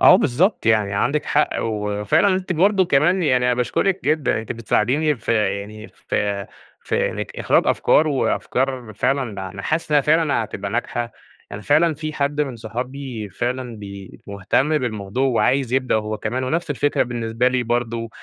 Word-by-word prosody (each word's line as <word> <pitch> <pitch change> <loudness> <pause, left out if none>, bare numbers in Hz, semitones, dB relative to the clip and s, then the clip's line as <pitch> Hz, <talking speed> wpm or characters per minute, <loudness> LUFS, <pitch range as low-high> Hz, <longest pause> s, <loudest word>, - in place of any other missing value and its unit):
اه 180 - +8
بالضبط، 170 - +1
يعني 110 -3 +3
عندِك 140 +9 0
حق، 150 - +2
وفعلًا 105 - +1
أنتِ 185 0 -2
برضه 190 +3 +3
كمان، 175 +4 +2
يعني 125 -4 +2
أنا 125 - +3
باشكرِك 185 +10 0
جدًا، 155 -2 +1
أنتِ 110 - -5
بتساعديني 130 +7 +1
في 115 - -2 0.3
يعني 105 +2 -10
في 100 -1 -3 0.3
في - - 0
إنك - - -6
إخراج - - +2
أفكار 155 - +3
وأفكار 130 -3 -1
فعلًا 110 -8 -1
أنا 100 +1 -8
حاسس 155 +5 -2
إنها 150 -1 +5
فعلًا 150 -5 +2
هتبقى 100 -2 -6
ناجحة، 120 0 -2 0.4
يعني 105 +1 -7
فعلًا 155 +2 +3
في 155 +1 -5
حد 145 0 -1
من 135 -5 -2
صحابي 120 0 -5
فعلًا 120 +4 -3
بي 100 -2 -10
مهتم 105 +10 +1
بالموضوع 110 0 -2
وعايز 125 +1 +1
يبدأ 130 -2 +1
هو 110 0 -1
كمان 125 +4 -2
ونفس 165 +4 -2
الفكرة 145 +1 +1
بالنسبة 120 0 0
لي 125 -1 0
برضه 115 -1 -2
125 Hz, 160 wpm, -21 LUFS, 110-150 Hz, 0.4 s, اه